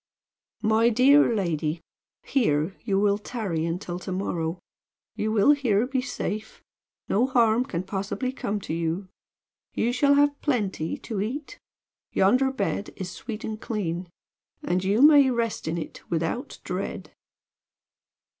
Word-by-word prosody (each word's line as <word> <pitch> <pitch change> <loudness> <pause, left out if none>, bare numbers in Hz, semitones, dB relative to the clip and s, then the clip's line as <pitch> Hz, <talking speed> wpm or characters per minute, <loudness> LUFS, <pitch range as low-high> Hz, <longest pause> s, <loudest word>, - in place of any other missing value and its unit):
"My 220 +2 +4
dear 260 +4 +5
lady, 165 -5 -1 0.4
here 180 - +1
you 195 -4 +1
will 205 0 +2
tarry 195 -8 -3
until 175 +1 -4
to 185 - -6
morrow. 175 -3 -2 0.6
You 215 +1 -1
will 215 +5 +5
here 245 -7 +2
be 260 0 -1
safe. 220 -4 -5 0.4
No 235 +6 +2
harm 235 -2 +3
can 180 -9 -3
possibly 200 +7 -3
come 210 -5 -3
to 160 - -5
you. 170 +3 -2 0.7
You 240 +2 +1
shall 280 +2 +4
have 285 0 +3
plenty 205 - -1
to 215 -5 -4
eat; 285 - -5 0.5
yonder 255 +8 +3
bed 235 -5 -2
is 185 -2 -5
sweet 225 +1 -7
and 215 0 -5
clean; 180 -5 -3 0.5
and 180 +1 0
you 205 +7 +3
may 290 -3 +8
rest 235 -6 -1
in 165 +2 -1
it 160 - -6
without 170 - -2
dread." - - -4
210 Hz, 135 wpm, -26 LUFS, 180-250 Hz, 0.7 s, may